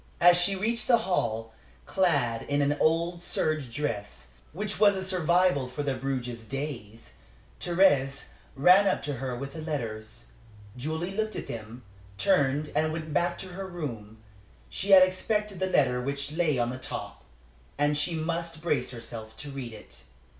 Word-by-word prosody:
As 175 0 +7
she 175 +3 +2
reached 225 +5 -1
the 240 - +6
hall, 115 -10 -1 0.3
clad 145 -12 +1
in 145 0 +2
an 145 +1 +2
old 170 +2 +1
serge 155 -6 0
dress, 100 - -4 0.2
which 205 +5 -4
was 205 -1 +6
a 190 - -3
survival 180 -5 +2
from 145 +3 -4
Bruges 125 -3 -3
days, 115 - -6 0.5
Thérèse 145 -7 +2 0.3
ran 180 +8 +6
up - - +1
to 145 -2 -3
her 130 0 -3
with 140 +2 -6
the 160 - -6
letters. 110 - -5 0.5
Julie 160 +8 -3
looked 215 0 -1
through - - -4
them, 115 +2 -8 0.3
turned 140 +8 +2
and 155 +1 +2
went 155 -1 -5
back 175 +4 +1
to 190 - -7
her 190 +2 -6
room. 120 - -6 0.5
She 195 - -3
had 190 -1 +10
expected 200 +1 -1
the 190 - +1
letter 130 -8 +2
which 140 +2 -3
lay 155 -3 +1
on 120 0 0
the 130 - -6
top, 100 -5 -7 0.5
and 145 +1 +2
she 145 +3 0
must 165 0 -3
brace 150 -7 0
herself 110 -2 -8
to 145 -1 -7
read 130 -4 -6
it. 110 - -12
145 Hz, 160 wpm, -28 LUFS, 125-175 Hz, 0.5 s, had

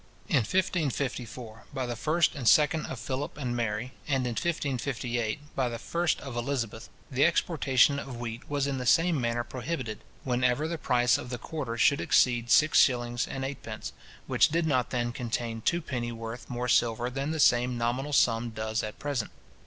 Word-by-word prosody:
In - - +3
1554, 125 - -2
by 130 - -1
the 120 - -3
1st 155 +7 +1
and 135 -6 -4
2nd 150 +3 +4
of 130 - -5
Philip 130 +4 -4
and 125 -4 -2
Mary, 115 +1 -2 0.2
and 135 -3 +1
in 125 - -1
1558, 130 -3 -2
by 130 -2 +1
the 115 - -4
1st 170 +5 0
of 135 -3 -7
Elizabeth, 120 -2 -3 0.2
the 135 +2 +2
exportation 140 -5 +3
of 135 -3 -7
wheat 115 -1 -6
was 145 -1 0
in 140 -2 -2
the 125 - -3
same 165 -2 +4
manner 120 0 0
prohibited, 125 -3 -4 0.2
whenever 125 +3 +1
the 165 0 -4
price 120 -2 +3
of 125 - -7
the 125 - -3
quarter 125 -3 -5
should 140 +4 +4
exceed 120 -2 +3
six 155 +4 +5
shillings 120 -2 +2
and 135 0 -4
eightpence, 135 0 -6 0.3
which - - +3
did 165 +2 +1
not 130 -6 +1
then 120 -1 -1
contain 115 -2 -3
two 170 +9 +1
penny 120 -5 -3
worth 115 +1 -7
more 125 0 -3
silver 120 0 +2
than 135 +3 -2
the 160 0 -2
same 125 -2 +4
nominal 125 +5 -1
sum 120 -4 +3
does 110 -1 -2
at 105 -1 -6
present. 140 -7 -2
125 Hz, 180 wpm, -28 LUFS, 120-140 Hz, 0.3 s, six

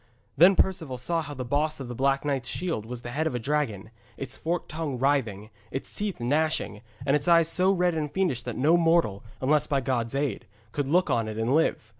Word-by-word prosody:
Then 185 +4 +7
Perceval 165 -10 0
saw 165 +7 -1
how 145 -2 -7
the 130 -1 -5
boss 150 +4 0
of 135 - -6
the 120 - -5
Black 135 +3 +1
Knight's 135 -4 -1
shield 165 - -3
was 120 0 -7
the 120 - -6
head 155 +5 0
of 130 - -3
a - - -1
dragon, 115 -6 -2 0.3
its 135 -1 -5
forked 170 +4 -2
tongue 155 -4 -3
writhing, 115 -6 0 0.2
its 135 - -6
teeth 205 -2 -3
gnashing, 145 -3 0 0.2
and 140 0 +3
its 145 +1 -1
eyes 170 -2 +5
so 185 +3 +3
red 180 -2 +2
and 150 -2 -2
fiendish 180 -11 0
that 120 -1 -6
no 155 +7 +4
mortal, 165 -12 +2 0.2
unless 145 +3 +2
by 140 - +1
God's 125 -2 -1
aid, 140 -6 -2 0.2
could 145 +2 -2
look 180 +5 +2
on 115 -2 +1
it 110 0 -5
and 115 +4 0
live. 155 -7 +1
140 Hz, 220 wpm, -27 LUFS, 120-160 Hz, 0.3 s, Then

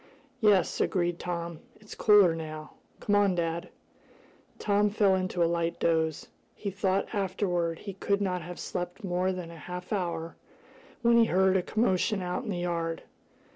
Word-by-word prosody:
"Yes," 205 -6 +3
agreed 175 -2 0
Tom. 170 -2 -4 0.2
"It's 210 0 -12
cooler 205 -5 +5
now. 155 -1 -7 0.3
Come 205 - +1
on, 200 -2 +3
dad." 170 0 -2 0.9
Tom 205 0 +2
fell 205 -2 +3
into 185 -2 0
a - - +4
light 170 0 -1
doze. 160 -2 0 0.3
He 200 - -4
thought 195 +1 -1
afterward 185 -4 -1
he 200 +2 -7
could 200 +1 0
not 185 -3 -1
have 175 +2 -8
slept 180 +4 -5
more 185 0 0
than 180 -2 -6
half 180 +2 -8
an 210 - +2
hour 170 -2 -4 0.7
when 235 0 +5
he 230 - +6
heard 190 -1 +3
a 190 - +3
commotion 205 -1 +1
out 180 +7 -2
in - - -5
the 185 - -2
yard. 170 -2 -2
180 Hz, 165 wpm, -29 LUFS, 170-200 Hz, 0.9 s, he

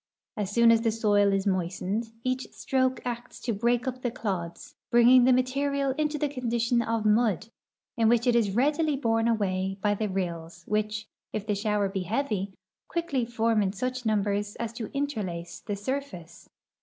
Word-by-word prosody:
As 205 -3 -2
soon 235 +2 +5
as 225 -1 +4
the 230 - +2
soil 205 -2 +3
is 195 0 0
moistened, 190 +4 -1
each 255 0 -1
stroke 260 -1 0
acts 240 0 -5
to 235 - -1
break 235 +3 +1
uj) 255 -1 -4
the 245 - 0
clods, 200 +2 -4 0.2
bringing 245 +1 +6
the 260 - +5
material 275 +2 +1
into 300 0 0
the 295 - 0
condition 240 -3 0
of 225 -1 -1
mud, 220 0 +2 0.5
in 225 -1 +4
which 235 0 +3
it 245 -1 +3
is 205 -4 +2
readily 295 +4 +2
borne 225 -4 +1
away 195 -4 0
by 205 +1 +2
the 210 0 -2
rills 170 -2 -4
which, 215 0 -1 0.3
if 210 -1 -3
the 210 - 0
shower 205 0 0
be 195 0 -3
heavy, 205 -1 -1 0.4
quickly 310 -8 -1
form 230 -2 +1
in 195 -1 0
such 255 +4 -3
numbers 205 -1 0
as 230 -1 -4
to 230 -2 -5
interlace 205 -12 -3
the 205 - -4
surface. 200 - -6
225 Hz, 175 wpm, -27 LUFS, 200-255 Hz, 0.5 s, bringing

